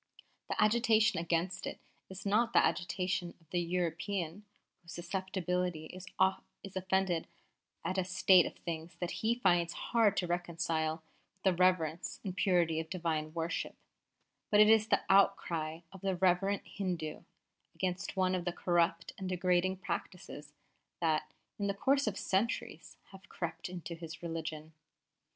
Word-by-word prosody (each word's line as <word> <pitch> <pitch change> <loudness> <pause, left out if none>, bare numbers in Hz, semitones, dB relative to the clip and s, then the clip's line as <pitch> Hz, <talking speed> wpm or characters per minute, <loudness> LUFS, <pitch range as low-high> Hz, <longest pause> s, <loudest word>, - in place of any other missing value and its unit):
The - - -2
agitation 220 -1 +4
against 170 +2 -1
it - - -6 0.3
is 190 +1 -9
not 220 +4 +2
the - - +6
agitation 180 -1 -1
of 165 - -27
the 175 - +1
European 175 +2 -2 0.4
whose 170 -1 -11
susceptibility 180 -2 -2
is 185 +3 -10 0.7
offended 190 -2 0 0.6
at 185 +1 0
a - - +2
state 185 -1 +5
of - - -8
things 165 -1 -6
that 175 - -3
he 225 +2 +2
finds 175 -7 +2
hard 220 -4 +2
to 180 - +1
reconcile 165 -2 -1 0.3
with 190 - -40
the 190 - +4
reverence 175 -2 +1
and 185 -3 -4
purity 175 -4 +2
of 160 0 -5
Divine 160 -4 -2
worship; 165 +1 -2 0.7
but 210 - +4
it 215 +1 +8
is 220 -1 +5
the - - +2
outcry 165 -4 +2
of 190 -2 -12
the 195 -1 0
reverent 190 +2 +2
Hindu 175 -6 -4 0.5
against 185 +2 -2
one 185 0 +2
of 180 -1 -1
the 175 - -1
corrupt 170 -1 +1
and 190 -1 -3
degrading 180 +1 +1
practices 180 -6 -6 0.5
that, 160 -3 0 0.3
in 200 - 0
the 200 - -1
course 275 +5 +2
of 200 -2 -1
centuries, 205 +6 -1
have 195 -1 -14
crept 170 0 -4
into 175 -1 -6
his 165 0 -9
religion. 160 -1 -5
180 Hz, 145 wpm, -33 LUFS, 170-190 Hz, 0.7 s, it